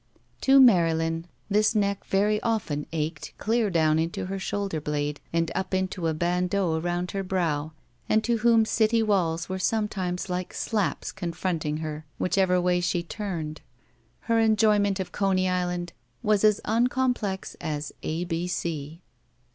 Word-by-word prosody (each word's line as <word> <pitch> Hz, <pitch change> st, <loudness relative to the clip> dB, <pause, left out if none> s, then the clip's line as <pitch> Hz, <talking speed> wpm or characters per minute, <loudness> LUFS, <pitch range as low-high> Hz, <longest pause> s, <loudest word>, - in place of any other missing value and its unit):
To 275 Hz, 0 st, +6 dB
Marylin, 165 Hz, -8 st, +4 dB, 0.2 s
whose 215 Hz, +2 st, +3 dB
neck 200 Hz, -1 st, 0 dB
very 210 Hz, +2 st, +2 dB
often 195 Hz, -11 st, -1 dB
ached 155 Hz, -1 st, -4 dB
clear 225 Hz, 0 st, +1 dB
down 160 Hz, -3 st, +3 dB
into 165 Hz, +2 st, -2 dB
her 195 Hz, +1 st, -4 dB
shoulder 195 Hz, -4 st, -2 dB
blade 145 Hz, 0 st, -2 dB
and 165 Hz, 0 st, 0 dB
up 190 Hz, 0 st, -2 dB
into 185 Hz, -2 st, -1 dB
a 160 Hz, -, +1 dB
bandeau 175 Hz, 0 st, 0 dB
arotmd 175 Hz, +1 st, -2 dB
her 195 Hz, -, -2 dB
brow, 165 Hz, -5 st, -1 dB, 0.4 s
and 215 Hz, 0 st, +3 dB
to 235 Hz, 0 st, +1 dB
whom 230 Hz, -1 st, +4 dB
city 225 Hz, +1 st, +2 dB
walls 170 Hz, -6 st, +1 dB
were 190 Hz, 0 st, -3 dB
sometimes 190 Hz, -4 st, -1 dB
like 180 Hz, 0 st, -4 dB
slaps 205 Hz, -10 st, -1 dB
confronting 170 Hz, -4 st, -2 dB
her 155 Hz, 0 st, -6 dB
whichever 185 Hz, -1 st, +2 dB
way 180 Hz, 0 st, +2 dB
she 175 Hz, -1 st, 0 dB
ttamed, 170 Hz, -5 st, -5 dB, 0.6 s
her 230 Hz, -1 st, +1 dB
enjoyment 210 Hz, -3 st, +3 dB
of 190 Hz, -, -4 dB
Coney 190 Hz, -2 st, +1 dB
Island 180 Hz, -1 st, -1 dB, 0.3 s
was 210 Hz, -2 st, +2 dB
as 210 Hz, -2 st, +5 dB
unoomplex 240 Hz, -3 st, 0 dB
as 150 Hz, -2 st, -3 dB
A 160 Hz, +3 st, -2 dB
B 170 Hz, 0 st, -2 dB
C. 165 Hz, -2 st, -4 dB
180 Hz, 145 wpm, -26 LUFS, 165-210 Hz, 0.6 s, To